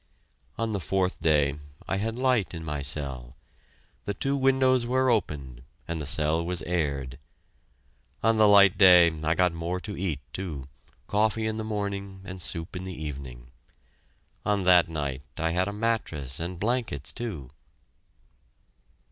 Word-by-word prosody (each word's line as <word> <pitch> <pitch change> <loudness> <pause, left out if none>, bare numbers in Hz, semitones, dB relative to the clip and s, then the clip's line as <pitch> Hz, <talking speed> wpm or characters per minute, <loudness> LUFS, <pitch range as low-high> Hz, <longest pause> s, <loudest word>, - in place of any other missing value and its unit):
On 115 -1 -1
the 100 - -1
fourth 95 0 -1
day 75 -3 +2 0.3
I 95 - -1
had 110 +3 -2
light 125 -8 +1
in 80 -1 -7
my 75 -2 -3
cell. 65 -3 -2 0.7
The 100 - -3
two 135 +7 -1
windows 130 -2 +3
were 130 +1 +2
opened 70 - -2 0.3
and 85 -1 -3
the 75 - -3
cell 80 +3 +2
was 90 -1 0
aired. 70 -6 -2 1.0
On 115 0 +3
the 110 - +7
light 100 -2 +6
day 90 -3 +8
I 80 +1 +2
got 90 -2 +2
more 85 +2 -3
to 105 +1 -6
eat, 85 -7 -2
too, 80 -9 -5 0.4
coffee 110 +1 +1
in 110 0 -1
the 110 - -3
morning, 100 -2 -4
and 95 -1 -8
soup 85 +1 -3
in 90 - -5
the 95 -4 -7
evening. 65 -5 -7 0.9
On 100 -2 +1
that 90 -2 +5
night 70 -4 -3 0.2
I 80 +1 0
had 90 +3 +1
a - - -2
mattress 105 - -2
and 85 +1 -5
blankets, 115 - -1
too. 85 - -6
90 Hz, 155 wpm, -27 LUFS, 75-105 Hz, 1.0 s, day